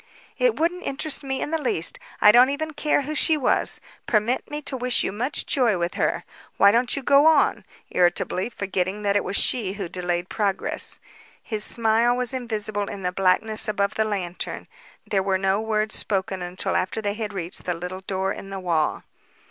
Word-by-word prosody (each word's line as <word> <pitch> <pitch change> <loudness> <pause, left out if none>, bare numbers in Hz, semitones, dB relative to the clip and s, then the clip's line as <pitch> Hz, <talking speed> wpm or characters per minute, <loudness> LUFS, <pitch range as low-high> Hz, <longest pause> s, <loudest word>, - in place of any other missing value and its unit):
"It - - +2
wouldn't 350 +3 0
interest 285 +2 +2
me 265 -1 -3
in - - -3
the 325 -1 -1
least. 170 - 0 0.2
I 210 - +9
don't 245 +4 +6
even 310 +3 -3
care 295 -1 +1
who 300 +3 -4
she 310 +1 +3
was. 265 - +2 0.3
Permit 230 +3 0
me 295 - -4
to 270 - -3
wish 250 -1 +1
you - - -1
much 250 +9 -2
joy 240 -8 +2
with 170 0 -2
her. - - -1 0.3
Why 200 - +7
don't 240 +3 +1
you 280 - -4
go 280 +4 +5
on?" 315 -3 +3 0.3
irritably, 180 +3 +1
forgetting 195 -1 -3
that 200 -1 +1
it 205 - +2
was 185 - -3
she 205 -5 +2
who 195 -3 -5
delayed 175 0 -2
progress. 200 -2 0 0.4
His 215 -3 -1
smile 230 +2 +2
was 250 -1 -2
invisible 215 -5 -3
in 195 -1 -7
the 180 - 0
blackness 195 +4 +1
above 200 -1 0
the 220 - +1
lantern. 190 -5 -4 0.4
There 195 -2 0
were 190 0 +1
no 195 +2 +1
words 215 -1 -1
spoken 190 -2 -1
until 180 +2 -3
after 185 +4 -1
they 205 -2 -2
had 215 -1 -4
reached 180 -3 -6
the 180 - -1
little 180 +2 -6
door 190 0 -2
in 195 - -9
the 195 0 -5
wall. 165 -4 0
210 Hz, 195 wpm, -24 LUFS, 190-250 Hz, 0.4 s, I